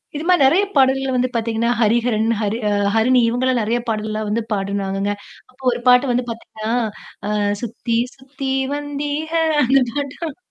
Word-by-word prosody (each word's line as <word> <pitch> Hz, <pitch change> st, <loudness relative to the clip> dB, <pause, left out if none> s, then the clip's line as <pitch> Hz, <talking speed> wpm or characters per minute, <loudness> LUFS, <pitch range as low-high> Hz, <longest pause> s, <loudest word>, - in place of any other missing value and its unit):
இதுமாரி 345 Hz, +3 st, +2 dB
நிறைய 335 Hz, +9 st, +4 dB
பாடல்கள் 265 Hz, 0 st, +3 dB
வந்து 250 Hz, 0 st, +1 dB
பார்த்தீங்கன்னா, 230 Hz, 0 st, 0 dB
ஹரிஹரன், 225 Hz, 0 st, +2 dB
ஹரி 210 Hz, +1 st, -1 dB
ஆ -, -, 0 dB, 0.2 s
ஹரிணி 250 Hz, +3 st, +4 dB
இவுங்க 245 Hz, +2 st, 0 dB
எல்லாம் 255 Hz, -2 st, +2 dB
நிறைய 230 Hz, +3 st, 0 dB
பாடல்கள் 215 Hz, -1 st, -2 dB
எல்லாம் 215 Hz, 0 st, -3 dB
வந்து 230 Hz, +2 st, 0 dB
பாடுனாங்கங்க. 195 Hz, 0 st, -2 dB, 0.4 s
அப்போ 265 Hz, +1 st, -21 dB
ஒரு 240 Hz, -, -3 dB
பாட்டு 250 Hz, +1 st, +5 dB
வந்து 245 Hz, +1 st, +1 dB
பார்த்தீங்கன்னா, 225 Hz, -1 st, -6 dB, 0.6 s
ஆ -, -, -2 dB, 0.3 s
"சுத்தி, 235 Hz, 0 st, -2 dB, 0.2 s
சுத்தி 270 Hz, 0 st, -6 dB, 0.2 s
வந்திக!" 290 Hz, +1 st, -3 dB, 0.3 s
அந்த 265 Hz, +2 st, +4 dB
பாட்டும் 285 Hz, +2 st, -4 dB
245 Hz, 155 wpm, -20 LUFS, 220-270 Hz, 0.6 s, பாட்டு